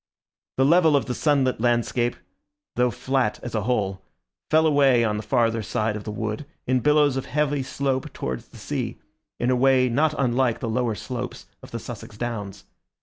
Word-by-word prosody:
The 135 - +4
level 165 0 +5
of 140 - +2
the 125 - -2
sunlit 135 -5 +1
landscape, 120 0 +1 0.6
though 125 0 +3
flat 130 -2 -1
as 120 - -6
a 110 - 0
whole, 100 -4 -1 0.5
fell 160 +1 +4
away 140 -5 +4
on 105 -2 0
the - - -3
farther 115 -1 +1
side 110 +2 -1
of 105 - -7
the 105 - -4
wood 110 +6 -4 0.2
in 130 0 +2
billows 150 0 +3
of 135 - -4
heavy 145 -1 0
slope 130 0 -2
towards 65 0 -5
the - - -15
sea, - - -4 0.4
in 120 +1 +1
a - - +3
way 130 0 +4
not 150 +5 +2
unlike 125 -2 +1
the 115 - -3
lower 115 0 0
slopes 125 +2 -6 0.2
of - - -12
the - - -5
Sussex 105 - -9
downs. 105 -4 -5
125 Hz, 185 wpm, -24 LUFS, 115-135 Hz, 0.6 s, level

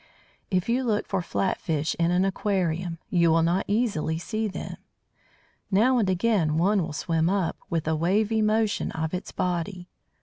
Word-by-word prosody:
If 185 -2 0
you 245 +3 +1
look 220 -4 0
for 195 -2 -1
flat 185 +2 -1
fish 155 -3 -1
in 170 0 +3
an 180 +2 +2
aquarium, 180 -3 -1
you 170 -2 +4
will 165 0 +4
not 175 +3 +1
easily 200 -8 0
see 215 +6 -2
them. 195 - -6 0.9
Now 235 +6 +4
and 200 -4 +1
again 185 -5 +1
one 195 +4 +3
will 160 - -3
swim 165 +2 0
up, 190 -3 0
with 165 -2 -1
a 160 - +2
wavy 210 +7 +1
motion 215 0 +1
of 160 +1 -3
its 180 - -4
body. 180 +1 -3
185 Hz, 170 wpm, -26 LUFS, 165-210 Hz, 0.9 s, you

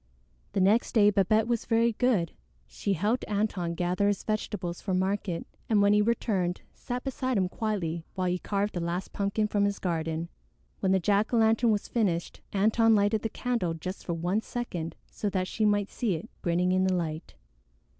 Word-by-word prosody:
The - - +1
next 210 +5 +3
day 210 -2 +6
Babette 215 +2 +3
was 235 -2 0
very 230 0 +3
good. 215 -8 +1 0.3
She 200 - -2
helped 210 +8 0
Antone 200 -5 -1
gather 180 +3 +1
his 205 -1 0
vegetables 200 -5 -3
for 190 -3 -1
market, 190 -2 -1 0.2
and 215 -2 +4
when 200 0 +5
he 210 - +5
returned 205 -5 0
sat 245 0 -5
beside 260 -2 -1
him 185 -2 +2
quietly 180 -6 -2
while 185 -1 -1
he 180 0 0
carved 200 +2 -1
the 175 - -2
last 175 +2 -3
pumpkin 200 +2 0
from 205 -1 +1
his 200 0 0
garden. 165 -1 -2 0.5
When 190 - +1
the 190 - +4
jack 200 +4 +2
o' - - +4
lantern 225 +1 +4
was 210 -2 +1
finished, 185 -8 -1
Antone 220 +3 +4
lighted 205 +1 +2
the 225 - -2
candle 230 -9 -1
just 185 +4 -6
for 170 - -2
one 175 +6 0
second 180 -10 -4
so 210 - -3
that 185 -2 -1
she 215 +4 0
might 205 -1 +2
see 220 -8 0
it 160 - -8
grinning 180 +1 +1
in 185 0 +3
the 185 -1 +2
light. 160 - -4
200 Hz, 190 wpm, -28 LUFS, 180-220 Hz, 0.5 s, day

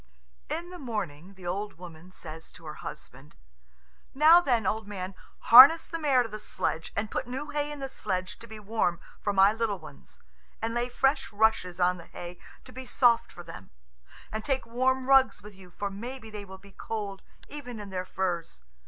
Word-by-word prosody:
In 345 +2 -4
the 360 - -9
morning 195 - -5
the 185 -2 -13
old 200 +4 -3
woman 175 0 -12
says 160 -2 -10
to 165 - -15
her 150 - -6
husband, 145 -2 -10 0.8
"Now 315 +5 +8
then, 240 - +1
old 215 +2 -1
man, 190 -2 -5 0.3
harness 270 +8 +10
the 330 - -5
mare 275 -5 +3
to 230 - -7
the 215 - -7
sledge, 165 -5 -3
and 205 +1 -2
put - - -2
new 265 +4 -5
hay 295 0 -2
in 295 - -6
the 270 - -3
sledge 185 -8 -4
to 230 - -12
be 220 -1 -9
warm 205 -5 0 0.2
for 205 - 0
my 195 +1 +5
little 220 -3 -1
ones, 155 -5 -13 0.4
and 225 +1 -2
lay 240 +1 -1
fresh 270 +3 +1
rushes 205 -4 +1
on 180 0 +3
the 170 - -13
hay 175 0 -9 0.3
to 255 - -12
be 260 0 -9
soft 240 -3 +3
for 175 - -10
them; 165 - -11 0.6
and 220 0 -4
take 265 0 -1
warm 255 +2 0
rugs 270 -3 +4
with 210 0 -11
you, 190 -1 -15
for 200 +3 -4
maybe 230 +3 -7
they 210 -1 -7
will 190 0 -10
be 200 +1 -17
cold, 200 -1 -5 0.3
even 250 -6 -8
in 205 -2 -8
their 185 -1 -3
furs. 170 - -3
210 Hz, 195 wpm, -28 LUFS, 185-255 Hz, 0.8 s, harness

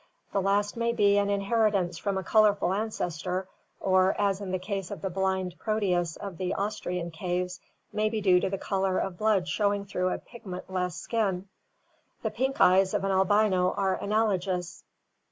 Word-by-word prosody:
The 200 - +2
last 200 +2 +1
may 235 0 0
be 205 -2 +4
an 200 0 +1
in 200 -1 +1
heritance 195 -5 +1
from 200 +1 -1
a 190 - -2
colorful 205 -4 +3
ancestor, 185 -3 -2 0.3
or, 185 0 +3
as 200 -1 +1
in 195 - -5
the 185 - 0
case 195 0 -4
of 205 - -7
the 190 - -2
blind 190 -1 -1
Proteus 180 -6 0
of 195 -4 -8
the 185 -1 -1
Austrian 180 -4 -3
caves, 180 +2 -3 0.3
may 215 0 +1
be 220 0 -2
due 185 -3 +4
to - - -1
the 195 - -2
color 190 -1 0
of 180 -2 -3
blood 210 -4 +2
showing 200 0 0
through 185 -2 -1
a - - -1
pigment 190 -6 -9
less 180 -2 -1
skin. 195 -5 -1 0.8
The - - -1
pink 265 +1 -1
eyes 190 +1 +5
of - - 0
an 195 - +1
albino 190 -1 +3
are 195 -1 +1
analogous. 190 -4 -1
195 Hz, 180 wpm, -28 LUFS, 180-205 Hz, 0.8 s, eyes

